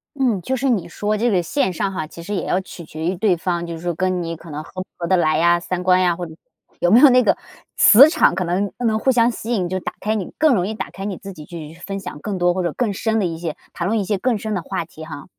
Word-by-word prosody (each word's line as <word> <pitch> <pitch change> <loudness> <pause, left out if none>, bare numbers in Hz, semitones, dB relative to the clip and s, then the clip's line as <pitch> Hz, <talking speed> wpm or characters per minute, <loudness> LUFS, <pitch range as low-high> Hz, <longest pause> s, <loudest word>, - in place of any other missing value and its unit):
嗯， 250 -8 +1
就 260 - -1
是 265 +2 0
你 195 -9 0
说 210 +5 -2
这 235 +2 +1
个 185 - +2
线 190 - 0
上 195 +3 -1
哈， 185 -4 -3
其 165 +2 -11
实 205 +5 -4
也 180 - -2
要 185 - 0
取 175 -2 -11
决 155 +1 -8
于 180 +3 0
对 185 0 +2
方， 170 0 -2
就 170 - -6
是 160 - -10
说 175 -1 -2
跟 185 +1 0
你 165 -1 -4
可 165 0 -12
能 150 +1 -5
合 185 +3 -7
不 - - -49
合 170 - -4
得 185 - +3
来 155 -2 +2
呀， 170 +1 +4
三 180 +1 -3
观 185 0 +4
呀， 175 -2 +2
或 180 - -6
者 160 - -12 0.4
有 175 - +2
没 230 - +8
有 290 - +9
那 250 0 +5
个 - - +3 0.4
磁 255 +7 +9
场， - - +3
可 185 - -1
能 185 +3 -1
能 220 -1 +2
互 265 - +2
相 240 -1 +3
吸 230 +1 -6
引， 185 -6 0
就 185 +1 -2
打 - - -5
开 215 +2 -1
你 205 -5 -3
更 310 -3 +4
容 185 -5 +1
易 220 - -4
打 - - -5
开 195 - -8
你 200 -3 -3
自 195 -1 -9
己 155 -3 -11
去 160 -2 -9
分 195 +4 -6
享 170 - -8
更 200 -3 -3
多 175 0 +2
或 185 - -1
者 175 -2 -1
更 225 -5 -1
深 220 +3 -1
的 210 - +1
一 165 -2 -3
些， 165 -3 -4 0.2
谈 175 +1 -3
论 220 +1 +1
一 200 - -2
些 205 - 0
更 240 0 +1
深 215 +1 -4
的 185 - -1
话 165 - -4
题 160 -1 -12
哈。 155 -3 -8
185 Hz, 330 characters per minute, -20 LUFS, 170-215 Hz, 0.4 s, 有